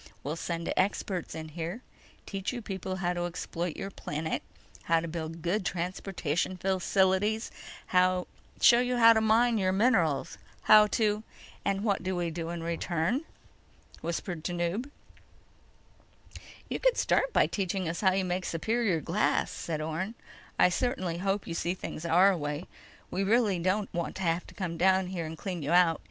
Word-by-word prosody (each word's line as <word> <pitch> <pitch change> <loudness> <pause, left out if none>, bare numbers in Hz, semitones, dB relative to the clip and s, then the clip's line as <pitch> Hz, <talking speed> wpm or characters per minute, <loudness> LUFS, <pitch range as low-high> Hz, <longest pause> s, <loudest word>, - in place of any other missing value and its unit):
We'll 150 +3 -3
send 170 0 -3
experts 190 -1 -1
in 160 0 -6
here, 170 +9 -5 0.4
teach 195 -1 -3
you 245 -2 -6
people 190 -2 -4
how 180 -2 -1
to 175 0 -2
exploit 175 -1 -4
your 195 - -5
planet, 160 -2 -3 0.4
how 165 0 +3
to 165 - -4
build 165 0 -5
good 190 +4 0
transportation 180 -1 -2
facilities, 190 +3 +1 0.4
show 185 +6 +3
you 250 0 0
how 230 -1 +8
to 220 - +2
mine 225 +1 +3
your 185 -1 +2
minerals, 185 - +2 0.2
how 215 0 +8
to—" 210 -1 +1 0.4
"And 195 0 0
what 205 -3 +1
do 185 0 -2
we 175 -1 -1
do 165 0 -4
in 170 -1 -4
return?" 170 - -1 0.8
whispered 170 0 -4
Tanub. 175 +9 -2 1.8
"You - - -3
could - - +3
start - - +2
by - - +4
teaching 190 -2 -2
us 165 +1 -3
how 190 -2 +4
you 190 0 +1
make 180 0 -2
superior 200 0 0
glass," 190 +8 +1
said 155 -2 -4
Orne. 165 +8 -3 0.4
"I - - +6
certainly 185 -5 -1
hope 195 +1 -1
you 170 - -5
see 175 +2 -1
things 170 -2 -6
our 185 +4 +5
way. 150 0 -3 0.5
We 195 - 0
really 210 -3 +3
don't 195 +4 0
want 170 -1 -3
to 190 - -4
have 170 0 0
to - - -14
come 180 -5 -3
down 185 +1 +3
there 170 -4 -3
and 160 +1 -7
clean 180 -1 -4
you 150 +4 -1
out. 175 -3 +5
185 Hz, 165 wpm, -29 LUFS, 170-200 Hz, 1.8 s, how